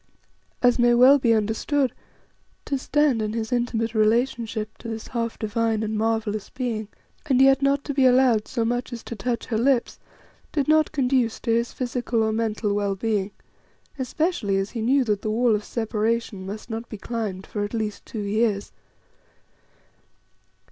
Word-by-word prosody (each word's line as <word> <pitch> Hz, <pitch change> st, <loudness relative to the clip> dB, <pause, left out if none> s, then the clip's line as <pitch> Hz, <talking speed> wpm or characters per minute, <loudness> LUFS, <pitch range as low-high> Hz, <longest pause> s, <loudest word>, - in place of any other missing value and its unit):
As 245 Hz, 0 st, +4 dB
may 240 Hz, 0 st, +5 dB
well 260 Hz, +4 st, +7 dB
be 240 Hz, -3 st, +2 dB
understood, 225 Hz, +5 st, +1 dB, 0.7 s
to 280 Hz, -, -1 dB
stand 285 Hz, -4 st, +2 dB
in 215 Hz, 0 st, -2 dB
his 225 Hz, -1 st, -3 dB
intimate 235 Hz, -2 st, 0 dB
relationship 220 Hz, -1 st, 0 dB
to -, -, -9 dB
this 225 Hz, -1 st, -6 dB
half 230 Hz, -2 st, -3 dB
divine 220 Hz, 0 st, 0 dB
and 220 Hz, 0 st, -2 dB
marvellous 215 Hz, -1 st, -1 dB
being, 235 Hz, -5 st, -3 dB, 0.4 s
and 260 Hz, -3 st, +3 dB
yet 270 Hz, 0 st, +5 dB
not 275 Hz, 0 st, +2 dB
to 285 Hz, -, -3 dB
be 265 Hz, -1 st, +4 dB
allowed 250 Hz, -4 st, +4 dB
so 235 Hz, -3 st, -1 dB
much 245 Hz, +2 st, -2 dB
as 235 Hz, -1 st, -7 dB
to 235 Hz, -, -6 dB
touch 235 Hz, +3 st, -2 dB
her 220 Hz, -2 st, -1 dB
lips, 255 Hz, 0 st, +1 dB, 0.5 s
did 285 Hz, -3 st, 0 dB
not 310 Hz, 0 st, +4 dB
conduce 255 Hz, -5 st, +1 dB
to 230 Hz, -, -1 dB
his 235 Hz, +1 st, 0 dB
physical 245 Hz, -2 st, -1 dB
or 220 Hz, 0 st, 0 dB
mental 220 Hz, -2 st, -1 dB
well 200 Hz, -1 st, 0 dB
being, 205 Hz, -1 st, -1 dB, 0.7 s
especially 260 Hz, -, 0 dB
as 195 Hz, +1 st, -2 dB
he 230 Hz, -, -4 dB
knew 265 Hz, +4 st, +3 dB
that 210 Hz, -4 st, -1 dB
the 215 Hz, -, -2 dB
wall 230 Hz, +1 st, +2 dB
of 210 Hz, 0 st, 0 dB
separation 220 Hz, -3 st, -2 dB
must 210 Hz, +2 st, -7 dB
not 225 Hz, 0 st, -6 dB
be 215 Hz, -, -7 dB
climbed 210 Hz, -4 st, -4 dB
for 205 Hz, -, -3 dB
at 205 Hz, +3 st, -4 dB
least 215 Hz, -2 st, -3 dB
two 220 Hz, -, -6 dB
years. 205 Hz, 0 st, 0 dB
230 Hz, 170 wpm, -24 LUFS, 215-250 Hz, 0.7 s, well